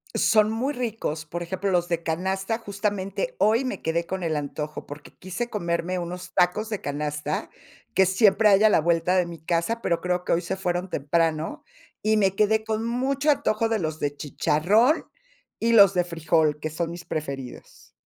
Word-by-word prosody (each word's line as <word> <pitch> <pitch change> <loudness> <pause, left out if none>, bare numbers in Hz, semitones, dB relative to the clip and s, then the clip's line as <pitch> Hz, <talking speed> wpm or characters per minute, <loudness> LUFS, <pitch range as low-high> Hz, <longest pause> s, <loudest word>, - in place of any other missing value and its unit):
Son 215 -1 +4
muy 260 +6 -1
ricos, 220 -11 -3
por 175 +3 -5
ejemplo, 190 +3 -2
los 175 -1 +1
de 170 -1 -1
canasta, 190 +6 -1
justamente, 205 - -3
hoy 225 +5 +3
me 255 - -4
quedé 170 +1 -1
con 190 +1 -4
el 160 -2 -1
antojo, 150 +1 -5
porque 145 +1 -10
quise 190 +6 -5
comerme 170 -2 -2
unos 180 +1 -6
tacos 195 +5 +2
de 210 - -3
canasta 150 +1 -3 0.5
que 190 +1 +5
siempre 205 +2 +4
hay 195 +1 +5
a 215 - +7
la - - +4
vuelta 170 +2 +2
de 180 - +3
mi 170 -2 -9
casa, 175 +8 -1
pero 170 -1 0
creo 180 0 -1
que - - -3
hoy 170 - +1
se - - -3
fueron 180 -1 -2
temprano, 160 +2 -1 0.4
y 215 0 +3
me 195 -2 +2
quedé 220 +1 +2
con 220 +1 -2
mucho 270 +5 +1
antojo 225 -4 0
de 225 -2 +1
los 155 -2 -3
de 145 0 -2
chicharrón 195 - +2 0.6
y 230 0 +2
los 200 -4 +7
de 180 - +3
frijol, 160 -3 +1
que 155 - -3
son 165 +2 -3
mis 175 +1 -9
preferidos. 140 -4 -7
180 Hz, 185 wpm, -25 LUFS, 165-215 Hz, 0.6 s, a